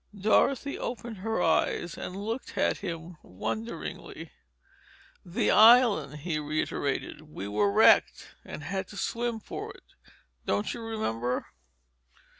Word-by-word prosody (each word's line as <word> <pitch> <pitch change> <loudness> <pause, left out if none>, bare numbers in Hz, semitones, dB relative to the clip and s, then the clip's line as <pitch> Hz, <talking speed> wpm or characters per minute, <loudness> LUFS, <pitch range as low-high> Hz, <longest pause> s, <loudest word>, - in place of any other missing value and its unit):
Dorothy 265 +7 +2
opened 235 -1 -5
her 215 0 -1
eyes, 175 - +1
and 180 - -6
looked 225 +6 -5
at - - +2
him 170 -2 -6
wonderingly. 110 +4 -6 0.9
"The 175 0 0
island—" 220 - +6
he 160 -1 -2
reiterated. 150 -1 -2
"We 100 - -6
were 105 0 +1
wrecked—had 185 - +2
to 205 - -11
swim 235 +1 -2
for - - -7
it. - - -16 0.6
Don't 100 +1 -1
you 235 - -7
remember?" 125 - -2
180 Hz, 110 wpm, -28 LUFS, 140-225 Hz, 0.9 s, island